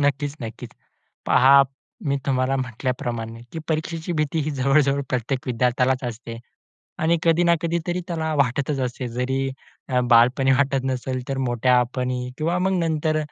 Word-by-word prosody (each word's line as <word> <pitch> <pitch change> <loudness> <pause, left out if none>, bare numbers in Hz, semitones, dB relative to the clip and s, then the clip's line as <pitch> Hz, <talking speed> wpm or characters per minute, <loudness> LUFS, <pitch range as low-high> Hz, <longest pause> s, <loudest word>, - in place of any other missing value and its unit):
नक्कीच 145 0 0
नक्कीच. 110 -1 -7 0.6
पहा 135 +2 +7 0.4
मी 140 0 +1
तुम्हाला 130 0 +1
म्हटल्याप्रमाणे 120 -2 -3
की 160 - -5
परीक्षेची 160 +2 -2
भीती 155 0 -1
ही 150 - -2
जवळ-जवळ 140 0 +2
प्रत्येक 130 +1 -2
विद्यार्थ्यालाच 125 +2 +1
असते 115 -1 -6 0.6
आणि 165 +2 +2
कधी 165 +1 +3
ना 170 0 +4
कधी 170 0 0
तरी 175 +1 -1
त्याला 160 -2 -2
वाटतच 140 +1 0
असते. 125 0 -3
जरी 130 +3 -1 0.6
बालपणी 125 +3 +5
अ, - - +6
वाटत 135 -2 +1
नसेल 130 0 -2
तर 135 - -2
मोठेपणी 125 +1 +1
किंवा 170 +3 0
मग 190 +1 +1
नंतर 155 -2 0
135 Hz, 145 wpm, -23 LUFS, 125-155 Hz, 0.6 s, पहा